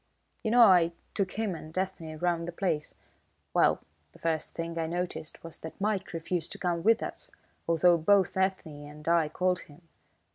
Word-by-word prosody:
"You 220 Hz, -, -1 dB
know 240 Hz, +1 st, +7 dB
I 175 Hz, -5 st, +6 dB, 0.2 s
took 195 Hz, -3 st, -1 dB
him 220 Hz, -3 st, -1 dB
and 160 Hz, 0 st, -9 dB
Ethne 170 Hz, -4 st, -3 dB
round 170 Hz, 0 st, 0 dB
the -, -, -3 dB
place. 170 Hz, -4 st, -2 dB, 0.6 s
Well, -, -, +4 dB, 0.3 s
the -, -, -16 dB
first 160 Hz, -1 st, -2 dB
thing 165 Hz, 0 st, -4 dB
I 160 Hz, -, -1 dB
noticed 175 Hz, -2 st, -4 dB
was 165 Hz, -1 st, -7 dB
that 160 Hz, -, -9 dB
Mike 200 Hz, -1 st, -1 dB
refused 165 Hz, 0 st, -3 dB
to -, -, -8 dB
come 175 Hz, -2 st, -1 dB
with 225 Hz, +5 st, +4 dB
us, -, -, -6 dB, 0.4 s
although 170 Hz, +1 st, +4 dB
both 190 Hz, +3 st, +3 dB
Ethne 185 Hz, -6 st, -1 dB
and 150 Hz, +1 st, -12 dB
I 165 Hz, -2 st, +3 dB
called 180 Hz, +3 st, +1 dB
him. 165 Hz, +2 st, -16 dB
170 Hz, 180 wpm, -29 LUFS, 160-190 Hz, 0.6 s, know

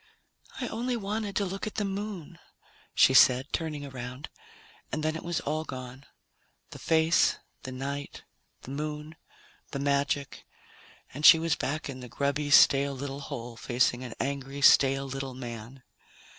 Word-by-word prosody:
"I 250 Hz, -, -2 dB
only 240 Hz, +2 st, -2 dB
wanted 210 Hz, -1 st, -3 dB
to 200 Hz, -, +1 dB
look 195 Hz, +3 st, -4 dB
at 215 Hz, -, -6 dB
the 210 Hz, -, -1 dB
Moon," 195 Hz, -4 st, -5 dB, 0.6 s
she 130 Hz, -, +6 dB
said, 130 Hz, +1 st, +5 dB
turning 155 Hz, -3 st, -3 dB
around, 130 Hz, +1 st, -7 dB, 0.6 s
and 155 Hz, -, -3 dB
then 155 Hz, 0 st, 0 dB
it 160 Hz, -, -6 dB
was 170 Hz, -1 st, -2 dB
all 155 Hz, +2 st, -2 dB
gone 130 Hz, -1 st, -9 dB, 0.6 s
the -, -, -9 dB
face, 160 Hz, +1 st, +3 dB, 0.2 s
the 130 Hz, -, -7 dB
night, 140 Hz, +2 st, -5 dB, 0.4 s
the 130 Hz, -, -9 dB
Moon, 150 Hz, +2 st, -5 dB, 0.5 s
the -, -, -5 dB
magic 140 Hz, 0 st, -1 dB, 0.7 s
and 145 Hz, +4 st, -7 dB
she 165 Hz, -, +10 dB
was 165 Hz, -1 st, 0 dB
back 155 Hz, +3 st, -3 dB
in 135 Hz, -2 st, -7 dB
the 125 Hz, -1 st, -9 dB
grubby, 140 Hz, +4 st, -1 dB
stale 140 Hz, 0 st, +6 dB
little 140 Hz, +1 st, -5 dB
hole, 120 Hz, -5 st, -7 dB
facing 120 Hz, +1 st, 0 dB
an 120 Hz, -3 st, -7 dB
angry, 140 Hz, +1 st, -3 dB
stale 135 Hz, 0 st, +5 dB
little 135 Hz, -1 st, -5 dB
man. 120 Hz, +1 st, -8 dB
140 Hz, 155 wpm, -28 LUFS, 130-160 Hz, 0.7 s, she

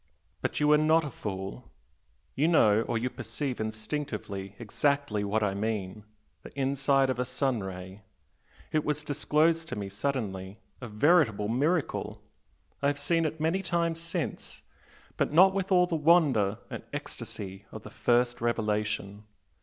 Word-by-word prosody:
But -, -, -1 dB
you 150 Hz, 0 st, +4 dB
are 150 Hz, -, +6 dB
not 160 Hz, +1 st, +4 dB
a 150 Hz, -, -5 dB
fool, 95 Hz, +2 st, -6 dB, 0.6 s
you 150 Hz, +4 st, +2 dB
know 110 Hz, -11 st, +5 dB
or 115 Hz, -, 0 dB
you 120 Hz, +3 st, -1 dB
perceive 120 Hz, +2 st, -4 dB
instinctively 110 Hz, -3 st, -4 dB
exactly 125 Hz, -1 st, 0 dB
what 105 Hz, +2 st, 0 dB
I 100 Hz, -2 st, +1 dB
mean. 105 Hz, -1 st, -3 dB, 0.4 s
The -, -, -10 dB
inside 135 Hz, 0 st, +2 dB
of 125 Hz, -, -4 dB
a -, -, +2 dB
sun 125 Hz, 0 st, -1 dB
ray! 95 Hz, +1 st, -7 dB, 0.7 s
it 155 Hz, -1 st, +1 dB
was 150 Hz, 0 st, -1 dB
disclosed 155 Hz, +3 st, +1 dB
to -, -, -3 dB
me 100 Hz, -1 st, -4 dB
suddenly 100 Hz, -4 st, -3 dB, 0.2 s
a 125 Hz, -, -5 dB
veritable 110 Hz, -, +3 dB
miracle! 145 Hz, +6 st, 0 dB, 0.6 s
I 140 Hz, -, +2 dB
have 145 Hz, 0 st, +1 dB
seen 165 Hz, +3 st, +1 dB
it 155 Hz, +1 st, -3 dB
many 165 Hz, +5 st, +1 dB
times 170 Hz, -3 st, 0 dB
since, 165 Hz, 0 st, -4 dB, 0.5 s
but -, -, +1 dB
not 190 Hz, +4 st, +7 dB
with 195 Hz, 0 st, -2 dB
all 180 Hz, -1 st, +6 dB
the 175 Hz, -, -2 dB
wonder 145 Hz, -, +4 dB
and -, -, -5 dB
ecstasy 95 Hz, 0 st, -7 dB
of 110 Hz, -, -9 dB
the 105 Hz, -, -10 dB
first 120 Hz, +1 st, +1 dB
revelation. 105 Hz, -3 st, -1 dB
125 Hz, 155 wpm, -29 LUFS, 105-150 Hz, 0.7 s, not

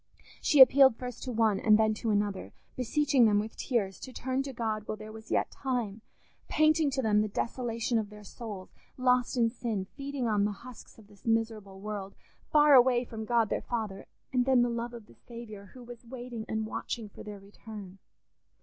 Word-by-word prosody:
She 290 Hz, -, +5 dB
appealed 265 Hz, -1 st, +8 dB
first 250 Hz, 0 st, -7 dB
to 255 Hz, -, -3 dB
one 220 Hz, -4 st, +2 dB
and 215 Hz, 0 st, +5 dB
then 220 Hz, 0 st, +3 dB
to 225 Hz, +1 st, -3 dB
another, 205 Hz, -2 st, -1 dB, 0.2 s
beseeching 265 Hz, 0 st, +3 dB
them 210 Hz, -1 st, +3 dB
with 215 Hz, +1 st, -5 dB
tears 205 Hz, -7 st, -1 dB
to 260 Hz, -, -8 dB
turn 260 Hz, +1 st, -2 dB
to 275 Hz, 0 st, -5 dB
God 220 Hz, -3 st, -3 dB
while 215 Hz, -, -3 dB
there 215 Hz, 0 st, -9 dB
was 220 Hz, 0 st, -12 dB
yet -, -, 0 dB
time; 240 Hz, -6 st, -3 dB, 0.5 s
painting 310 Hz, -1 st, +3 dB
to 265 Hz, -1 st, -2 dB
them 210 Hz, -1 st, +3 dB
the 215 Hz, -, 0 dB
desolation 230 Hz, +2 st, -1 dB
of 210 Hz, -2 st, -4 dB
their 210 Hz, 0 st, -12 dB
souls, 205 Hz, -3 st, -8 dB, 0.2 s
lost 250 Hz, 0 st, +2 dB
in 235 Hz, -1 st, +4 dB
sin, 225 Hz, -5 st, -3 dB
feeding 275 Hz, +2 st, -4 dB
on 210 Hz, -2 st, +2 dB
the 205 Hz, 0 st, 0 dB
husks 255 Hz, -2 st, -12 dB
of 220 Hz, -, -16 dB
this 205 Hz, +1 st, -17 dB
miserable 220 Hz, -4 st, -1 dB
world, 200 Hz, -1 st, -6 dB, 0.4 s
far 295 Hz, -1 st, +6 dB
away 250 Hz, -1 st, +6 dB
from 220 Hz, -2 st, -7 dB
God 230 Hz, -2 st, +2 dB
their -, -, -1 dB
Father; 215 Hz, -5 st, -4 dB, 0.3 s
and 250 Hz, -1 st, +2 dB
then 260 Hz, -2 st, +4 dB
the 245 Hz, -, +1 dB
love 235 Hz, +1 st, -4 dB
of 230 Hz, -3 st, -10 dB
the -, -, -18 dB
Saviour, 230 Hz, -4 st, -10 dB
who 250 Hz, -, -10 dB
was 240 Hz, -1 st, -11 dB
waiting 240 Hz, -2 st, -7 dB
and 220 Hz, 0 st, -1 dB
watching 220 Hz, +1 st, -4 dB
for 205 Hz, -, -13 dB
their 205 Hz, -1 st, -8 dB
return. 200 Hz, -1 st, -11 dB
230 Hz, 200 wpm, -30 LUFS, 210-250 Hz, 0.5 s, appealed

